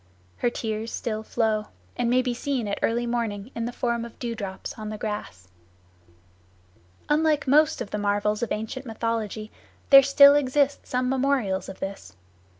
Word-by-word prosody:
Her 240 - +1
tears 220 -1 -4
still 215 -2 -3
flow, 220 -1 -1 0.3
and 240 -1 0
may 255 +1 +3
be 250 -1 -1
seen 250 -2 -2
at 200 - -2
early 235 +1 +1
morning 230 -2 -3
in 230 - -3
the 240 - -3
form 235 -1 -1
of 235 -1 -10
dew 240 -2 -3
drops 195 -4 -6
on 215 -1 -7
the 215 - -5
grass. 205 - -5 1.6
Unlike 300 -1 +2
most 300 +3 +4
of 205 - -5
the 210 - -2
marvels 205 +1 0
of 235 - -2
ancient 225 +5 -4
mythology, 225 -1 -3 0.4
there 275 0 +11
still 280 +1 +7
exist 285 0 +1
some 250 0 0
memorials 260 -8 0
of 190 - -9
this. 190 - -6
230 Hz, 165 wpm, -25 LUFS, 210-255 Hz, 1.6 s, there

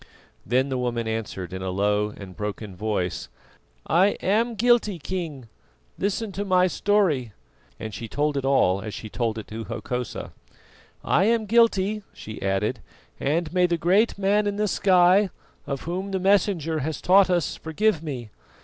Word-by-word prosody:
Then 130 +5 +2
the 130 -1 -1
woman 120 -2 -2
answered 105 -5 -4
in 95 - -5
a 95 - -3
low 105 +2 +1
and 95 -2 -10
broken 105 -1 -5
voice: 100 -3 -2 0.6
"I 190 +5 +4
am 225 +4 +1
guilty, 225 -3 +3
King. 160 -7 -5 0.5
Listen 205 +2 -1
to 200 +1 -3
my 185 -2 +3
story:" 180 - +1 0.5
and 110 -1 -6
she 115 - -6
told 145 +5 -1
it 140 - -1
all 100 -9 +3
as 105 0 -6
she 110 - -7
told 115 -1 -2
it 110 - -6
to 110 +1 -6
Hokosa. 125 +1 -5 0.7
"I 190 - +3
am 225 0 +2
guilty," 215 -2 +3
she 110 -1 -9
added, 100 +5 0 0.4
"and 160 +3 -1
may 180 -1 +4
the 170 -1 0
Great 190 +8 +2
Man 205 +1 +2
in 205 - -1
the 210 +1 0
sky, 185 +1 +4 0.4
of 140 -2 -3
Whom 185 +4 -4
the 190 -1 -1
Messenger 185 -5 +2
has 155 +2 -3
taught 190 +1 +5
us, 175 -3 +1
forgive 165 +2 0
me. 130 -9 -6
160 Hz, 165 wpm, -25 LUFS, -, 0.7 s, taught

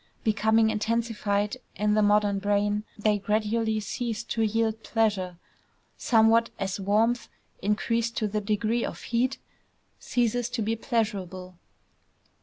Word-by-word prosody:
Becoming 220 +1 +3
intensified 215 -2 -1 0.2
in 210 0 +1
the 215 - +3
modern 205 -1 +3
brain, 205 +1 0
they 210 0 +1
gradually 215 +2 0
ceased 230 +1 -4
to 225 - 0
yield 220 0 0
pleasure, 205 -6 0 0.6
somewhat 225 0 +4
as 195 -1 -3
warmth 220 +5 +1 0.3
increased 230 +3 0
to 215 - +1
the 210 +1 -2
degree 215 +3 0
of - - -5
heat 250 +3 0 0.6
ceases 245 -1 0
to 230 -3 -2
be 225 +2 0
pleasurable. 190 -7 -3
215 Hz, 120 wpm, -27 LUFS, 205-230 Hz, 0.6 s, somewhat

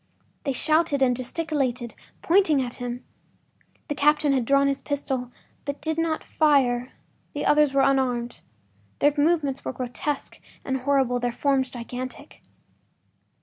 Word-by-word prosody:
They 275 - +1
shouted 310 +1 +2
and 250 -1 +3
gesticulated, 255 -3 -2 0.3
pointing 335 -5 +4
at 245 -2 -3
him. 245 0 -5 0.8
The 295 - -1
captain 295 0 +3
had 255 -3 +1
drawn 275 +2 +4
his 275 0 0
pistol, 265 -4 -3 0.3
but 285 0 -4
did 315 +1 -2
not 325 -1 -1
fire; 260 -5 +2 0.4
the - - -3
others 295 -1 +4
were 275 0 +3
unarmed. 255 -3 0 0.6
Their 290 0 +3
movements 290 -3 +1
were - - -4
grotesque 255 +4 -4 0.3
and 265 0 -1
horrible, 265 -2 +1
their 245 0 -1
forms 265 +1 +1
gigantic. 255 +4 -8
275 Hz, 135 wpm, -25 LUFS, 250-295 Hz, 0.8 s, pointing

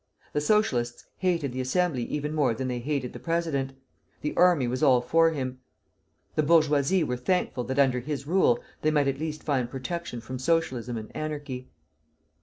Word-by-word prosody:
The 150 - +1
Socialists 140 - +1
hated 170 -7 0
the 130 - -2
Assembly 150 +1 +1
even 150 0 -3
more 140 -7 +2
than 130 +3 -3
they 125 -1 -2
hated 135 -1 -2
the - - -8
president. 160 -6 -1 0.5
The 150 - -3
army 175 -7 +4
was 125 +2 -2
all 135 -5 +6
for 165 +6 +4
him. 130 -5 -4 0.7
The - - +2
bourgeoisie 155 +2 +3
were 125 -4 -2
thankful 125 -2 0
that 130 - -3
under 130 -3 +4
his 140 +2 -4
rule 160 -7 +3 0.2
they 155 - +3
might 145 -2 +2
at 135 0 -1
least 155 -1 -4
find 130 -5 0
protection 135 +1 -4
from 125 +3 -6
Socialism 130 -6 0
and 110 -1 -8
anarchy. 145 -4 -5
140 Hz, 175 wpm, -27 LUFS, 125-160 Hz, 0.7 s, all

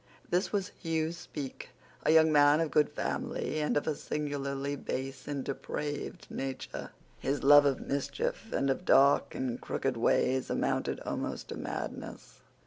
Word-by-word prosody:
This 180 +3 +1
was 200 -2 -1
Hugh 160 -2 0
Speke, 145 -5 -7 0.3
a - - +3
young 160 0 +6
man 145 0 +6
of 165 -2 0
good 150 -1 +4
family, 240 0 -2
but 150 - +1
of 145 - 0
a 155 - +1
singularly 140 -1 -3
base 135 -1 -5
and 140 -2 -2
depraved 145 +2 -4
nature. 135 -1 -5 0.3
His 140 +1 -1
love 145 +1 +8
of 135 - +1
mischief 230 - -2
and 135 0 +1
of 135 - -2
dark 140 -5 +5
and 125 -2 -2
crooked 135 -3 -2
ways 130 +2 +2
amounted - - 0
almost - - -4
to - - -4
madness. - - -6
145 Hz, 150 wpm, -31 LUFS, 135-160 Hz, 0.3 s, love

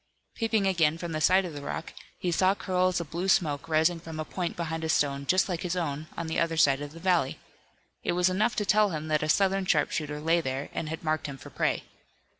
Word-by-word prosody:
Peeping 220 -3 0
again 165 -5 +2
from 170 0 -5
the 155 -1 -2
side 185 +4 +4
of 170 - -6
the 145 - -7
rock, 160 +3 -5 0.2
he 180 - -2
saw 185 +3 +3
curls 185 -2 +1
of 165 -4 -7
blue 175 +3 -2
smoke 160 -4 +1
rising 160 +2 +3
from 160 -1 -8
a 155 - -2
point 175 +2 -4
behind 160 -1 -3
a 160 - -2
stone 140 -2 +1
just 185 +1 +3
like 175 -4 -3
his 180 0 -2
own 155 -3 -3
on 170 - -3
the 160 - -1
other 165 -1 0
side 140 -3 +4
of 145 0 -6
the 165 - -10
valley. 175 -7 +1 0.7
It - - 0
was 180 +1 +3
enough 210 +5 +1
to 210 - 0
tell 210 +1 +4
him 155 -2 -4
that 155 -1 +2
a 155 - -2
Southern 195 +2 +2
sharpshooter 150 -2 0
lay 165 +3 +2
there 135 -1 -3
and 155 - -3
had 160 +1 -5
marked 155 -1 -1
him 140 -1 -7
for - - -12
prey. - - 0
165 Hz, 240 wpm, -28 LUFS, 155-185 Hz, 0.7 s, side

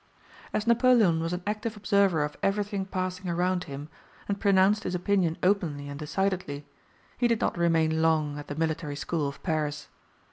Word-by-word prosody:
As 210 - -1
Napoleon 235 -7 +4
was 165 +1 -2
an 180 0 -3
active 215 +1 -3
observer 200 -6 +2
of 150 0 -4
everything 200 0 0
passing 185 -1 -3
around 180 +1 0
him, 145 -1 -7 0.4
and 200 -1 -2
pronounced 200 +1 +4
his 180 -4 -3
opinion 180 -2 +1
openly 170 -7 +1
and 140 0 -7
decidedly, 160 -3 -2 0.5
he 245 - +4
did 230 -2 +1
not - - 0
remain 160 -2 +2
long 155 -2 +1
at 145 - -9
the 145 - -5
Military 160 -1 -2
School 150 +1 -2
of 140 - -8
Paris. 150 -3 -2
180 Hz, 170 wpm, -28 LUFS, 155-200 Hz, 0.5 s, Napoleon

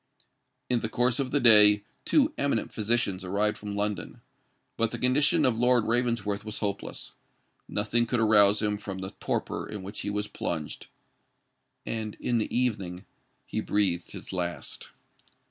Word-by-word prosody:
In 125 -1 +1
the 110 - -3
course 125 +2 +1
of 135 -2 -1
the 145 - +1
day 105 -4 +8 0.2
two 300 0 +3
eminent 140 -6 -1
physicians 105 -4 0
arrived 100 +3 0
from 105 -1 -7
London; 100 -4 -3 0.6
but 115 0 +1
the - - -5
condition 145 +5 +3
of 120 -3 +1
Lord 125 -1 +3
Ravensworth 115 -4 0
was 110 0 -5
hopeless: 100 -1 -4 0.6
nothing 115 +3 +1
could 120 0 0
arouse 105 -1 +4
him 105 -1 0
from 100 -2 -6
the 95 0 -6
torpor - - -3
in 105 -3 -6
which 100 +3 -7
he - - -3
was 105 0 -2
plunged; 80 -7 -5 1.0
and 110 -2 -4
in 120 -1 -1
the 110 - -3
evening 100 -7 -2 0.4
he - - -3
breathed 95 -4 0
his - - -9
last. 85 -2 -5
105 Hz, 155 wpm, -27 LUFS, 100-120 Hz, 1.0 s, day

